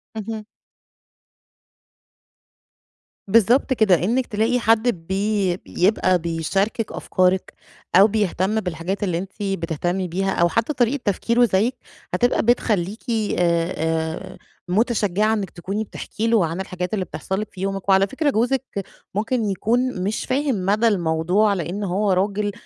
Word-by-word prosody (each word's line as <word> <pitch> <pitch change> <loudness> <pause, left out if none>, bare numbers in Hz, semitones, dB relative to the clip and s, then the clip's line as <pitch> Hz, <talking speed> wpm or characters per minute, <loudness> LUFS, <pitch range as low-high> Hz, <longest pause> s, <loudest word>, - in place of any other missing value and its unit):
اهم. 220 0 -5 2.8
بالضبط 230 +6 +4
كده، 215 -6 +4
إنِك 240 +6 +1
تلاقي 225 +4 +1
حد 225 0 +3 0.2
بي 195 -2 0
بيبقى 185 -1 +1
بيشاركِك 180 +7 -1
أفكارِك 185 0 0 0.4
أو 195 +3 +8
بيهتم 210 -1 0
بالحاجات 180 +1 -3
اللي 180 -4 0
أنتِ 190 +2 -5
بتهتمي 180 -1 -2
بيها، 190 +3 -1
أو 170 -2 +2
حتى 230 - 0
طريقة 250 +2 +1
تفكيره 235 +4 +2
زيِّك 220 +4 +1 0.4
هتبقى 245 0 +2
بتخلّيكِ، 215 -4 0
آآ 220 -3 0 0.4
آآ، 160 0 -2 0.3
متشجّعة 215 0 +1
إنِك 205 -4 -2
تكوني 195 +5 -4
بتحكي 220 +1 -4
له 225 -6 +3
عن 165 +4 -3
الحاجات 180 -1 -5
اللي 195 -3 -1
بتحصَل 190 +1 -4
لِك 215 - -4
في 185 - -10
يومِك. 195 0 -3
وعلى 195 0 +5
فكرة 290 +7 0
جوزِك 260 +2 +1 0.5
ممكن 225 +3 0
يكون 225 +2 0
مش 205 +3 -2
فاهم 260 -8 0
مدى 215 +4 +3
الموضوع 180 +2 +2
لأن 185 +2 -3
هو 200 +1 0
راجل، 200 +2 0
200 Hz, 130 wpm, -22 LUFS, 185-225 Hz, 2.8 s, أو